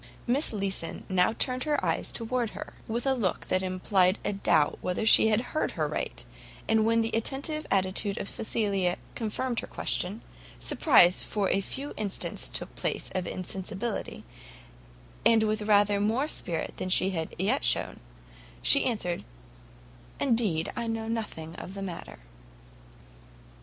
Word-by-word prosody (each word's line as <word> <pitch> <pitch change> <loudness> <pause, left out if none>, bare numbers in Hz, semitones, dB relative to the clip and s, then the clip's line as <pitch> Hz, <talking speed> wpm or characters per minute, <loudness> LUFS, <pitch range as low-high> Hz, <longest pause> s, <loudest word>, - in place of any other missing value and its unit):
Miss 265 +5 +2
Leeson 195 -5 -2
now 185 +3 +3
turned 255 +1 -1
her 295 -2 0
eyes - - -1
towards 235 -1 -1
her, - - -8
with 235 +3 -2
a 270 - +3
look 215 -9 -1
that 185 - +2
implied 185 0 +2
a - - 0
doubt 155 -6 +2
whether 180 +4 -1
she 220 - +7
had 220 +3 0
heard 310 - -1
right; - - -3 0.4
and 220 0 +3
when 230 0 +3
the 225 - -2
attentive 280 +7 -2
attitude 195 +1 0
of - - -4
Cecilia 200 -6 0 0.2
confirmed 235 +2 -2
her - - -6
question, 200 +6 -1 0.4
surprise 190 - +5
for 205 -3 -1
a 195 - +2
few 275 +8 -5
instants 205 -3 -2
took - - -3
place - - -3
of 185 -2 -2
insensibility, 195 +4 -4 1.0
and 225 -1 +5
with 215 0 0
rather 205 -1 +3
more 230 +8 +1
spirit 175 - -3
than 185 - -3
she 185 +1 +3
had 165 -3 -4
yet 190 +3 +1
shown, - - +2 0.6
she - - +6
answered, 205 -8 -1 1.0
"Indeed, 220 - +1
I 235 - -3
know 225 0 -3
nothing 205 -8 -4
of 190 - -8
the 195 - -5
matter." 180 -3 -7
210 Hz, 145 wpm, -28 LUFS, 185-230 Hz, 1.0 s, she